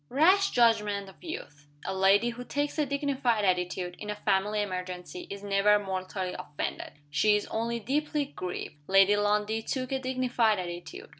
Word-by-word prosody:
Rash 370 Hz, +8 st, +4 dB
judgment 210 Hz, -4 st, +2 dB
of 190 Hz, -, -18 dB
youth! 150 Hz, -, -8 dB, 0.2 s
A -, -, -2 dB
lady 195 Hz, +5 st, +4 dB
who 240 Hz, +1 st, -6 dB
takes 290 Hz, +4 st, -2 dB
a 295 Hz, -, +2 dB
dignified 275 Hz, -6 st, 0 dB
attitude, 180 Hz, -1 st, 0 dB
in 210 Hz, -, -7 dB
a 210 Hz, -, -2 dB
family 205 Hz, +1 st, +1 dB
emergency, 180 Hz, -2 st, -6 dB
is 200 Hz, 0 st, -7 dB
never 200 Hz, +1 st, +4 dB
mortally 185 Hz, -1 st, -3 dB
offended 150 Hz, -5 st, -5 dB, 0.2 s
she 210 Hz, +8 st, +4 dB
is 210 Hz, -, -1 dB
only 235 Hz, +1 st, -1 dB
deeply 295 Hz, +5 st, -1 dB
grieved. 180 Hz, -, -6 dB
Lady 195 Hz, +1 st, +6 dB
Lundie 210 Hz, +1 st, +1 dB
took 255 Hz, +3 st, -3 dB
a 265 Hz, -, 0 dB
dignified 255 Hz, -4 st, +1 dB
attitude. 185 Hz, -, -7 dB
210 Hz, 160 wpm, -29 LUFS, 190-255 Hz, 0.2 s, Lady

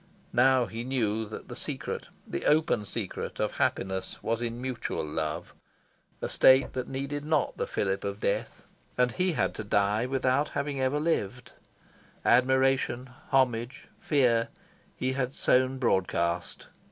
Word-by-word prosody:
Now 130 Hz, 0 st, +5 dB
he 115 Hz, +1 st, -6 dB
knew 110 Hz, -4 st, -1 dB
that 110 Hz, -, -8 dB
the -, -, -7 dB
secret, -, -, -4 dB, 0.2 s
the -, -, -4 dB
open 150 Hz, -8 st, +3 dB
secret, -, -, -5 dB
of -, -, -1 dB
happiness 95 Hz, 0 st, -1 dB
was 115 Hz, +1 st, -1 dB
in 120 Hz, 0 st, -3 dB
mutual 125 Hz, -9 st, -3 dB
love 75 Hz, 0 st, -3 dB, 0.7 s
a -, -, 0 dB
state 130 Hz, +1 st, +5 dB
that 130 Hz, -1 st, -3 dB
needed 140 Hz, +2 st, -3 dB
not 155 Hz, 0 st, +1 dB
the -, -, -2 dB
fillip 95 Hz, -1 st, -1 dB
of 100 Hz, 0 st, -3 dB
death. 100 Hz, -, -2 dB, 0.3 s
And 125 Hz, -1 st, +3 dB
he 185 Hz, +3 st, 0 dB
had -, -, 0 dB
to 110 Hz, -, -5 dB
die 105 Hz, +3 st, +1 dB
without 135 Hz, +2 st, +1 dB
having 140 Hz, -1 st, -2 dB
ever 130 Hz, +3 st, +1 dB
lived. 130 Hz, -7 st, -1 dB, 0.7 s
Admiration, 130 Hz, 0 st, +3 dB, 0.2 s
homage, 125 Hz, -2 st, +1 dB
fear, 120 Hz, -6 st, +2 dB, 0.5 s
he 130 Hz, +1 st, -1 dB
had 130 Hz, 0 st, -2 dB
sown 130 Hz, +1 st, +2 dB
broadcast. 90 Hz, -7 st, 0 dB
125 Hz, 140 wpm, -28 LUFS, 110-135 Hz, 0.7 s, Now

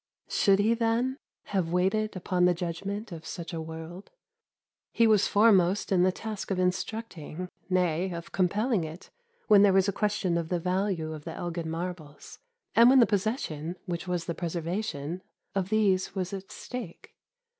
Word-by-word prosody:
Should 195 Hz, -1 st, +4 dB
he, 210 Hz, +3 st, +3 dB
then, 235 Hz, +4 st, 0 dB, 0.2 s
have 185 Hz, -5 st, -1 dB
waited 195 Hz, +5 st, +1 dB
upon 180 Hz, 0 st, +1 dB
the 180 Hz, 0 st, +4 dB
judgement 195 Hz, +5 st, -4 dB
of 165 Hz, -2 st, -7 dB
such 170 Hz, +2 st, -6 dB
a 165 Hz, -, -3 dB
world? 160 Hz, +4 st, -8 dB, 0.8 s
He 230 Hz, -, +3 dB
was 215 Hz, -3 st, +4 dB
foremost 200 Hz, -3 st, +4 dB
in 185 Hz, -2 st, +4 dB
the 185 Hz, +1 st, +4 dB
task 215 Hz, +2 st, -6 dB
of 195 Hz, -, 0 dB
instructing, 185 Hz, -2 st, -3 dB, 0.2 s
nay, 180 Hz, 0 st, +1 dB
of 170 Hz, -1 st, -7 dB
compelling 200 Hz, +3 st, +1 dB
it 160 Hz, +3 st, -9 dB, 0.4 s
when 210 Hz, -3 st, +7 dB
there 200 Hz, -1 st, +6 dB
was 190 Hz, 0 st, +4 dB
a -, -, +2 dB
question 200 Hz, -5 st, 0 dB
of 165 Hz, -1 st, -4 dB
the 180 Hz, -, 0 dB
value 180 Hz, -2 st, -1 dB
of 155 Hz, -2 st, -8 dB
the 165 Hz, 0 st, -6 dB
Elgin 170 Hz, -2 st, -4 dB
Marbles, 165 Hz, -3 st, -6 dB, 0.3 s
and 235 Hz, +2 st, +7 dB
when 265 Hz, 0 st, +7 dB
the 240 Hz, -, +7 dB
possession 190 Hz, -, -2 dB
which 175 Hz, +1 st, -4 dB
was 175 Hz, -2 st, -1 dB
the 170 Hz, -, -2 dB
preservation 170 Hz, -1 st, -3 dB, 0.3 s
of 195 Hz, -1 st, -1 dB
these 200 Hz, -3 st, +2 dB
was 185 Hz, 0 st, -2 dB
at 195 Hz, -1 st, -7 dB
stake. 245 Hz, -9 st, -8 dB
185 Hz, 165 wpm, -28 LUFS, 170-205 Hz, 0.8 s, when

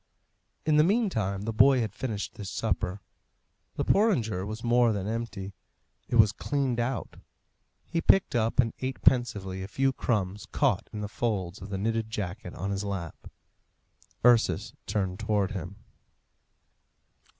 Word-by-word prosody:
In 155 Hz, -1 st, +4 dB
the 150 Hz, -, +7 dB
meantime 155 Hz, -, +1 dB
the 115 Hz, +1 st, -3 dB
boy 130 Hz, +3 st, +6 dB
had 110 Hz, -4 st, -3 dB
finished 110 Hz, -6 st, -4 dB
his 100 Hz, -3 st, -6 dB
supper. 100 Hz, -3 st, -2 dB, 0.7 s
The -, -, -1 dB
porringer 115 Hz, -, +2 dB
was 110 Hz, +2 st, -6 dB
more 120 Hz, 0 st, +4 dB
than 100 Hz, -2 st, -3 dB
empty; 110 Hz, -3 st, -4 dB, 0.5 s
it -, -, -2 dB
was 110 Hz, -3 st, +6 dB
cleaned 135 Hz, +1 st, -1 dB
out. 120 Hz, +1 st, -2 dB, 0.7 s
He 165 Hz, -, -1 dB
picked 195 Hz, -, +4 dB
up 115 Hz, 0 st, 0 dB
and 115 Hz, -3 st, +4 dB
ate 130 Hz, 0 st, -3 dB
pensively 100 Hz, -7 st, +2 dB
a 95 Hz, -, -5 dB
few 135 Hz, +5 st, +1 dB
crumbs 105 Hz, -5 st, -1 dB
caught -, -, +1 dB
in 105 Hz, -, -5 dB
the 105 Hz, -, -3 dB
folds 100 Hz, -5 st, -2 dB
of 100 Hz, -, -8 dB
the 100 Hz, -, -3 dB
knitted 110 Hz, +2 st, -1 dB
jacket 100 Hz, -3 st, -5 dB
on 100 Hz, +1 st, -3 dB
his 100 Hz, 0 st, -2 dB
lap. 95 Hz, -6 st, -5 dB, 1.0 s
Ursus 120 Hz, -2 st, +4 dB
turned 95 Hz, -3 st, -1 dB
towards 105 Hz, -2 st, 0 dB
him. 95 Hz, 0 st, -5 dB
110 Hz, 150 wpm, -28 LUFS, 100-120 Hz, 1.0 s, the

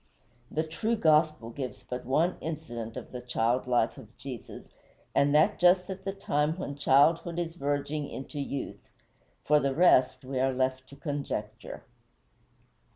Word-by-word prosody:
The 155 Hz, -, -1 dB
true 215 Hz, +9 st, -1 dB
gospel 155 Hz, -, +3 dB
gives 130 Hz, +1 st, -6 dB
but 125 Hz, 0 st, -6 dB
one 155 Hz, +8 st, +2 dB
incident 120 Hz, -8 st, -5 dB
of -, -, -8 dB
the 125 Hz, -, -6 dB
child 125 Hz, +1 st, 0 dB
life 120 Hz, -2 st, +1 dB
of 110 Hz, +2 st, -15 dB
Jesus, 130 Hz, -4 st, -9 dB, 0.4 s
and 145 Hz, +1 st, +3 dB
that 165 Hz, +8 st, +4 dB
just 180 Hz, +1 st, +4 dB
at 190 Hz, 0 st, -8 dB
the 195 Hz, -, -1 dB
time 155 Hz, -5 st, 0 dB
when 145 Hz, -6 st, -4 dB
childhood 145 Hz, +5 st, +3 dB
is 170 Hz, -1 st, -2 dB
verging 145 Hz, 0 st, -2 dB
into 140 Hz, +2 st, -7 dB
youth; 140 Hz, -1 st, -5 dB, 0.6 s
for 150 Hz, 0 st, +5 dB
the 140 Hz, -1 st, 0 dB
rest, 130 Hz, -6 st, +4 dB
we 130 Hz, 0 st, -2 dB
are 135 Hz, 0 st, +2 dB
left 130 Hz, 0 st, -1 dB
to 140 Hz, -, -12 dB
conjecture. 140 Hz, -9 st, -5 dB
145 Hz, 155 wpm, -29 LUFS, 130-160 Hz, 0.6 s, for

